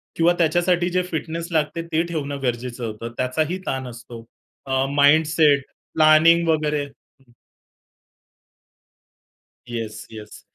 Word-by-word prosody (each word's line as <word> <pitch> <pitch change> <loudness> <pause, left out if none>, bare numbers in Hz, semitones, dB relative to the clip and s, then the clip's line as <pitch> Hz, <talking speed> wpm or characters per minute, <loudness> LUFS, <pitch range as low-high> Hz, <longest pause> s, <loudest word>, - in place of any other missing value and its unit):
किंवा 170 +1 +3
त्याच्यासाठी 175 +2 +2
जे 180 +1 +1
फिटनेस 165 +1 -4
लागते 160 +1 0
ते 160 +1 +2
ठेवणं 145 -5 -4
गरजेचं 120 0 -3
होतं. 115 +1 -6
त्याचाही 155 +7 -1
ताण 130 -1 -3
असतो. 120 -1 -10 0.4
अ, 130 0 0
माइंडसेट, 150 0 +4 0.3
प्लानिंग 160 +2 +5
वगैरे. 150 -2 +1
हं. 135 -2 -23 2.4
Yes, 115 -2 -6
yes. 110 -1 -11
150 Hz, 110 wpm, -22 LUFS, 125-165 Hz, 2.4 s, प्लानिंग